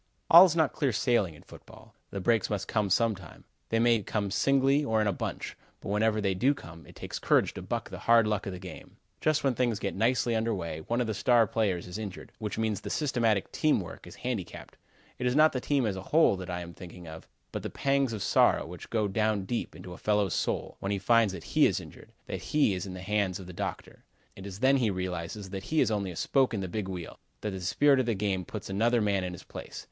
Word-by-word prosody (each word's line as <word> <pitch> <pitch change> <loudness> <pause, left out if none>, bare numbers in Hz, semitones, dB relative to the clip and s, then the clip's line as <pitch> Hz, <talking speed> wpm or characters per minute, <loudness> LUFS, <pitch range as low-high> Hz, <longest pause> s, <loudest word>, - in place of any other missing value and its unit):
All 170 +3 +11
is 170 -3 0
not 160 -4 +2
clear 140 -4 0
sailing 105 - +1
in - - -16
football. - - -15 0.2
The 100 - -5
breaks 110 +1 +2
must 105 -2 -2
come 105 -3 0
some 115 +4 +3
time. 95 - -13 0.3
They 115 - +1
may 115 -1 +4
come 100 0 -2
singly 135 +5 +3
or 110 -5 +1
in 105 - +2
a 100 - +1
bunch, - - -5 0.2
but - - -8
whenever 110 +1 +2
they 100 -2 +1
do 130 +10 +2
come, 85 -7 -12
it - - -15
takes - - -6
courage - - +2
to - - -7
buck - - -4
the - - -7
hard 115 -1 +5
luck 105 0 -1
in 95 - -4
the - - -6
game. 90 -3 -11 0.2
Just 155 -1 +1
when 135 -2 +2
things 120 -3 0
get 100 - -3
nicely 115 +2 +1
under 110 0 0
way 85 -4 -4
one 120 +1 0
of - - 0
the 110 - -2
star 120 +2 +4
players 100 -5 -1
is 90 +4 -6
injured, 100 -4 -7
which 105 -3 -4
means 110 -3 -1
the - - -6
systematic 115 -9 0
team 155 -6 +2
work 90 - -9
is - - -11
handicapped. 105 -9 -5 0.4
It 125 - 0
is 125 - +1
not 155 +1 +5
the 130 - -2
team, 140 -3 +1
as 105 -3 -1
a 95 - -5
whole 160 -9 +5
that 90 0 -7
I 90 0 -3
am 85 0 -8
thinking 90 -1 -11
of, 80 0 -10 0.2
but - - -4
the - - -4
pangs 140 -2 +1
of 110 -3 -3
sorrow - - +3
which 85 0 -10
go 110 -3 +1
down 105 -1 0
deep 120 +4 -3
into 90 - -9
a - - -11
fellow's 105 -3 +1
soul, - - -2
when 100 - -3
he 100 - 0
finds 115 +1 +3
that - - -7
he - - +4
is - - -1
injured; - - -13
that - - -5
he 150 -9 +2
is 90 +1 -4
in 95 - -7
the 90 - -7
hands 100 -2 0
of 95 - -9
the 90 - -9
doctor. - - -6 0.3
It 95 +1 -9
is 100 +2 -9
then 135 +1 +5
he 120 -5 +1
realizes 95 +1 -4
that 95 -1 -5
he 155 - 0
is - - +3
only 100 -3 -1
a 90 - -7
spoke 130 - +1
in 100 - -2
the 95 - -3
big 100 +2 -4
wheel; 90 -3 -7 0.2
that 105 - -2
the 95 -1 -6
spirit 140 +10 +3
of 130 - 0
the 115 - +1
game 95 -2 -1
puts 105 - -7
another 115 +5 +2
man 100 -3 +1
in 90 -1 -4
his 90 - -10
place. - - -9
105 Hz, 255 wpm, -29 LUFS, 95-120 Hz, 0.4 s, All